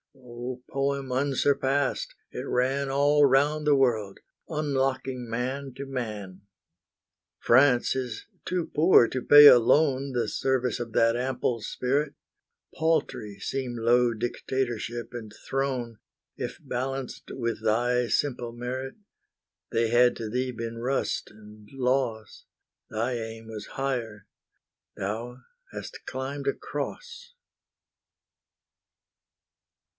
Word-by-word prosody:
O 125 0 -8
poem 140 -1 -2
unsurpassed! 140 +1 +1 0.2
it - - -5
ran 135 +2 0
All 145 +2 +4
round 145 +3 +2
the 145 - +6
world, 110 -7 +1 0.3
unlocking 135 -4 -1
man 130 +3 -3
to 140 - -6
man. 105 -8 -5 1.0
France 125 0 +4
is 125 -4 -4 0.2
too 180 -2 -2
poor 155 -6 +6
to 130 - -3
pay 145 +3 +9
alone 135 +2 +5
The 120 -3 0
service 130 0 0
of 115 -2 -5
that 115 0 +4
ample 125 -2 -1
spirit; 140 +7 -1 0.6
Paltry 155 -10 -1
seem 130 -3 -3
low 120 +1 +3
dictatorship 120 0 -3
and 110 -3 -7 0.2
throne, 130 -5 -2 0.4
If - - -5
balanced 130 +1 -4
with 115 -3 -3
thy 120 +2 +2
simple 125 -2 -1
merit. 130 +2 -5 0.8
They 115 0 +1
had 120 +1 +5
to 110 -2 -4
thee 125 +3 -1
been 115 -1 -6
rust 130 +3 -1
and 105 0 -15
loss; 125 -4 -1 0.4
Thy 115 +3 -1
aim 115 -1 -6
was 110 -2 -7
higher, 120 -6 -3 0.7
thou 115 +6 -4 0.3
hast - - -8
climbed 135 +2 -4
a 140 - +3
Cross. 475 - -6
125 Hz, 110 wpm, -27 LUFS, 115-135 Hz, 1.0 s, pay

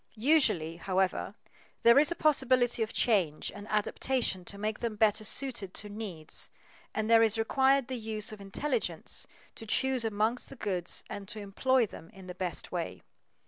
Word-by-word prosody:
Usually, 215 - +2
however, 190 +1 -1 0.5
there 235 +3 +8
is 300 +2 +5
a 345 - -1
possibility 255 -6 +3
of 220 - 0
change 185 -10 +1
and 205 0 -9
adaptation 215 -1 0
to 200 - -5
make 215 +1 -3
them 230 -2 -3
better 215 0 +3
suited 220 -5 -2
to 210 - -4
needs, 200 -7 -4 0.4
and 215 0 -2
there 230 0 +6
is 225 -1 +3
required 265 +3 +3
the 255 -2 -4
use 215 -1 -1
of 215 -2 -9
intelligence 290 - -2 0.3
to 225 - -8
choose 260 +2 +2
among 220 +2 0
the - - -10
goods 185 -7 -1
and 200 -1 -7
to 215 - -4
employ 235 +5 +2
them 165 -5 -12
in 190 -1 -12
the 180 - -7
best 180 -2 -4
way. - - -4
215 Hz, 170 wpm, -30 LUFS, 195-250 Hz, 0.5 s, there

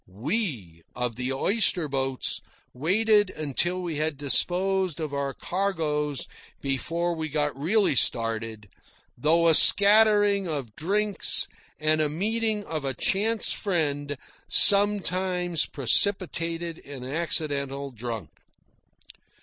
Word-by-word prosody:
We 110 - -3
of 125 -2 -3
the 125 +2 -3
oyster 180 +3 +2
boats 135 -2 -2 0.3
waited 205 - +2
until 175 +5 -2
we 165 -4 -4
had 155 -1 -2
disposed 180 +5 +1
of 155 -3 -5
our 140 -1 -2
cargoes 150 -5 -2 0.3
before 165 +6 -2
we 160 -1 -5
got 145 -1 -2
really 190 +9 +1
started, 115 -3 -1 0.5
though 165 +6 +2
a 165 - +5
scattering 205 +1 +5
of 140 -9 -5
drinks 205 +4 0 0.3
and 155 0 +1
a 150 - 0
meeting 215 +6 -1
of 155 -6 -5
a 135 -2 -3
chance 215 - 0
friend 145 -7 -2 0.3
sometimes 185 -4 +3
precipitated 165 - +1
an 135 -3 -9
accidental 140 -2 -2
drunk. 115 -2 -7
160 Hz, 110 wpm, -25 LUFS, 140-190 Hz, 0.5 s, a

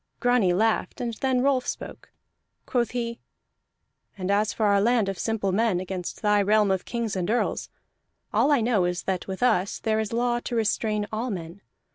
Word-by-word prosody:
Grani 245 -7 +3
laughed, 220 +5 +1
and 235 -1 -2
then 260 -2 +2
Rolf 265 -2 +2
spoke. - - -6 0.6
Quoth 240 -2 0
he: 235 -1 -3 1.0
"And 190 0 -2
as 210 +1 +2
for 220 - -1
our 200 -1 +4
land 230 -1 +3
of 195 -2 -3
simple 220 -4 -1
men 210 -2 +2
against 185 +1 -5
thy 210 -1 +4
realm 210 0 +3
of 190 -1 -1
kings 230 -4 -3
and 185 0 -2
earls, 240 +2 0 0.6
all 300 - +3
I 285 -5 +4
know 220 -5 +2
is 180 0 -2
that 190 -2 -2
with 190 +4 -4
us 200 -6 +2
there 220 -1 0
is 220 -2 -2
law 240 +1 +1
to 240 - -5
restrain 215 -1 0
all 230 +4 -2
men. 175 -1 -6
215 Hz, 185 wpm, -25 LUFS, 195-235 Hz, 1.0 s, our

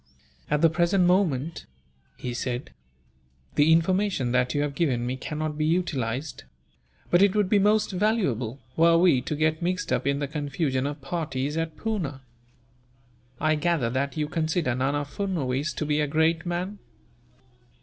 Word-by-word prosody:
"At 150 - +1
the 165 - +6
present 175 +3 +2
moment," 170 -5 +1 0.5
he 125 - -4
said, 125 +1 -4 0.8
"the 150 +2 +4
information 170 -5 +2
that 125 +1 +1
you 145 - +2
have 145 -1 -2
given 135 -6 0
me 125 +1 -2
cannot 150 +3 -4
be 155 - +1
utilized; 145 -5 -1 0.7
but 175 - +5
it 200 0 +4
would 210 -2 +2
be 205 - +5
most 210 +2 +3
valuable, 180 - 0 0.2
were 165 +1 +5
we 165 -7 +4
to 150 - -3
get 155 +2 +1
mixed 180 +1 -1
up - - 0
in 140 0 +2
the 145 0 -2
confusion 140 -2 -1
of 145 0 -6
parties 145 -2 -3
at 165 -1 -3
Poona. 175 -12 -3 1.2
I 155 0 +2
gather 155 -6 0
that 140 +4 -2
you 150 -1 0
consider 160 -3 0
Nana 140 +3 0
Furnuwees 150 -4 -2
to 155 - -2
be 150 0 +1
a 150 - +1
great 160 +3 +1
man." 180 +4 -3
155 Hz, 160 wpm, -26 LUFS, 140-175 Hz, 1.2 s, the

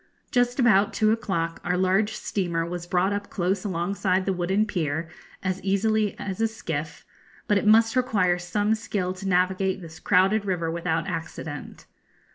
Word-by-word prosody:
Just 245 -1 +1
about 210 -5 +4
two 215 -1 +3
o'clock 190 -8 -2
our 180 0 0
large 190 +4 +2
steamer 170 -4 -2
was 175 0 -5
brought 185 +3 +1
up 205 0 -4
close 185 +2 -1
alongside 185 0 0
the 195 - +1
wooden 190 +4 +1
pier 160 -5 -2 0.3
as 185 0 -2
easily 210 +2 +1
as 195 +1 -4
a 225 - +4
skiff, 160 -9 -5 0.4
but 205 -2 +3
it 210 - -2
must 225 +2 +5
require 205 -9 +2
some 205 +5 0
skill 200 -4 -2
to 190 +1 -5
navigate 185 +1 +1
this 165 -3 -11
crowded 195 +2 +3
river 175 -4 -1
without 165 -1 -1
accident. 160 -2 -6
190 Hz, 160 wpm, -25 LUFS, 175-210 Hz, 0.4 s, must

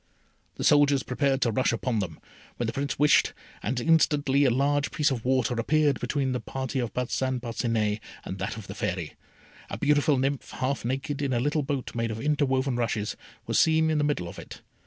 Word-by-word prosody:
The - - -5
soldiers 145 -2 +4
prepared 135 +1 0
to 115 - +2
rush 130 +5 +1
upon 115 0 -1
them, 85 -6 -4 0.4
when - - -1
the - - -2
Prince 140 +1 -2
wished, 150 +1 +4 0.3
and 120 +4 -1
instantly 145 -2 +3
a - - +5
large 140 +3 +1
piece 150 -1 +1
of 120 -4 -3
water 130 -2 +1
appeared 140 +2 +2
between 135 +1 -1
the 125 - -1
party 130 +1 -4
of 120 -3 -2
Parcin 130 +1 -1
Parcinet 115 -3 -1 0.3
and 95 - -6
that 105 +4 -3
of 110 - -8
the - - -7
Fairy. - - -3 0.6
A - - -4
beautiful 145 -1 +3
nymph, 135 +1 -1
half 130 0 -2
naked, 135 +4 -2
in 140 -2 0
a 120 - +1
little 145 +4 +1
boat 140 -2 -3
made 115 -1 -1
of 110 0 -4
interwoven 135 -2 +1
rushes, 110 -3 -1 0.3
was - - +1
seen 160 0 +4
in 155 - +1
the - - +1
middle 145 -12 0
of - - -9
it. - - -11
130 Hz, 200 wpm, -27 LUFS, 120-145 Hz, 0.6 s, a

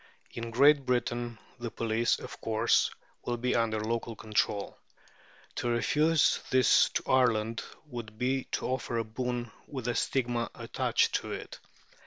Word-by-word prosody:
In 115 0 -5
Great 140 +4 +5
Britain 120 -1 -1 0.2
the 120 -1 -4
police, 115 +1 +1
of - - -9
course, 115 +1 +2 0.3
will 120 -1 -2
be 125 +2 0
under 115 -2 +1
local 115 +1 -2
control. 105 -2 -1 0.8
To 120 - -1
refuse 150 +7 +3
this 130 -3 +5
to - - +1
Ireland 115 -4 +2 0.2
would 120 -6 -8
be 130 +2 0
to - - -1
offer 125 -2 -2
a 115 - +1
boon 120 +1 -3 0.2
with 130 -4 -5
a 120 - +1
stigma 120 -4 0
attached - - 0
to - - -6
it. - - -7
120 Hz, 145 wpm, -30 LUFS, 115-125 Hz, 0.8 s, Great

